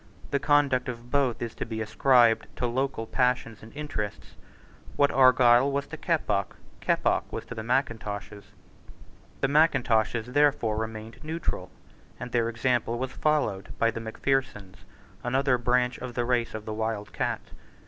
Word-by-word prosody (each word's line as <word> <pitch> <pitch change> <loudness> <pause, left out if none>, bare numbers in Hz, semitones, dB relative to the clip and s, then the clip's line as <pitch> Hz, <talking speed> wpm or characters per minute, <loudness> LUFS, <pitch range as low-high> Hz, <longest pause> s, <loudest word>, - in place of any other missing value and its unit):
The 140 - +1
conduct 140 -4 +2
of 120 0 -8
both 135 -5 +1
is 115 - -5
to - - -4
be 110 -1 -5
ascribed 115 +1 +3
to - - -2
local 130 -1 -1
passions 125 -2 0
and 110 - -12
interests. 105 - -5 0.6
What 145 0 +3
Argyle 130 0 +5
was 140 0 -1
to 160 - -6
Keppoch, 125 - -1 0.2
Keppoch - - 0
was - - -5
to - - -7
the 110 - -5
Mackintoshes. 110 -5 -2 1.0
The - - +3
Mackintoshes 125 -6 +2
therefore 145 -7 +2
remained 110 +2 -6
neutral; 160 +2 -4 0.5
and 125 0 -6
their 115 -1 +1
example 120 0 0
was 130 +1 -3
followed 150 -11 -1
by 115 0 +2
the 115 - -5
Macphersons, 110 -4 -2 0.5
another 130 +1 +1
branch 125 +1 +1
of 125 -1 -7
the 120 - 0
race 120 -2 0
of 110 -1 -6
the 110 - -4
wild 110 -1 -3
cat. - - -3
120 Hz, 150 wpm, -27 LUFS, 110-135 Hz, 1.0 s, Argyle